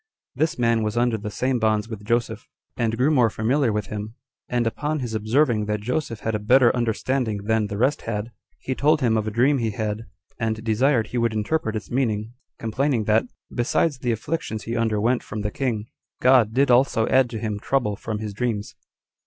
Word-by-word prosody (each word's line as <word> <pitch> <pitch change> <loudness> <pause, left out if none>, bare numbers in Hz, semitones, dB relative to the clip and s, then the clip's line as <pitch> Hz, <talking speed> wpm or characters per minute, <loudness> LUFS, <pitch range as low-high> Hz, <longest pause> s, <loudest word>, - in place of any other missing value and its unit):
This 155 +5 0
man 115 -2 +2
was 105 +1 -2
under 120 -1 +2
the 105 0 -5
same 125 +4 0
bonds 110 -1 +1
with 110 -3 -7
Joseph, 115 +2 -1 0.3
and 115 -1 -1
grew 135 +5 +3
more 125 -6 +4
familiar 120 +4 +1
with 105 0 -1
him; 105 +1 -6 0.3
and 120 -1 +1
upon 150 +7 -1
his 120 -5 -4
observing 110 +1 +2
that 105 0 -1
Joseph 120 0 -3
had 115 - -2
a 105 - 0
better 120 +4 +4
understanding 120 -2 -1
than 110 0 +1
the 100 -1 -5
rest 130 +6 +1
had, 110 +1 -4 0.3
he 130 - -3
told 150 +3 +2
him 115 -3 +2
of 110 -1 0
a - - +1
dream 130 +6 +2
he 115 -2 0
had, 110 +1 -3 0.3
and 110 -1 -2
desired 115 +1 +2
he 125 - -2
would 115 -1 +1
interpret 110 +2 -1
its 110 - -6
meaning, 115 -3 -1 0.2
complaining 120 +2 0
that, 110 +3 +2 0.3
besides 130 +4 +1
the 120 - 0
afflictions 110 -1 -3
he 115 - -4
underwent 115 +1 +1
from 110 - -6
the 105 0 -2
king, 115 -5 -2 0.3
God 125 -4 +5
did 135 +2 +3
also 120 -2 +4
add 130 -2 +3
to 115 - -5
him 105 -2 -3
trouble 110 -3 0
from 110 +2 -4
his 105 -1 -5
dreams. 110 -2 -2
115 Hz, 200 wpm, -23 LUFS, 110-125 Hz, 0.3 s, God